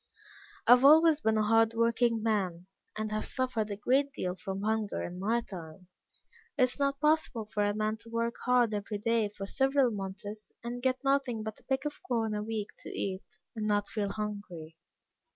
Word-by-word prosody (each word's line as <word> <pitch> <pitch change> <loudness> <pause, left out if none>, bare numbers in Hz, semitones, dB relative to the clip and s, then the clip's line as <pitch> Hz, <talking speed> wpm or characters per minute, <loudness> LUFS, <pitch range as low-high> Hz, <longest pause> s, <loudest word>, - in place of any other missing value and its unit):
"I - - +5
have 250 +1 +8
always 310 +2 +7
been 220 -4 +2
a 215 - +3
hard 225 +1 +3
working 230 0 +2
man, 190 -6 0 0.3
and 215 0 -3
have 215 0 -1
suffered 250 -5 -2
a 205 - -3
great 270 +7 +2
deal 180 0 -3
from 190 +2 -5
hunger 220 -1 -1
in 175 +1 -6
my 225 +5 +1
time. 175 -3 -10 0.7
It 260 - +4
is 255 +3 0
not 275 0 +1
possible 300 -7 +1
for 210 -1 -1
a 205 0 +1
man 215 0 -1
to 230 - -14
work 230 0 -1
hard 245 -3 +3
every 210 0 -3
day 225 0 +1
for 200 -1 -7
several 270 +3 +2
months, 205 +1 -6
and 240 +1 -5
get 260 +1 0
nothing 270 -5 +1
but 220 0 -6
a - - -25
peck 265 0 -1
of 295 - -4
corn 225 -3 -1
a 210 - -2
week 215 -1 -3
to - - -9
eat, 190 -1 -5 0.2
and 215 -1 -2
not 205 -1 +1
feel 205 -2 -2
hungry. 200 -7 -6
220 Hz, 195 wpm, -30 LUFS, 205-245 Hz, 0.7 s, have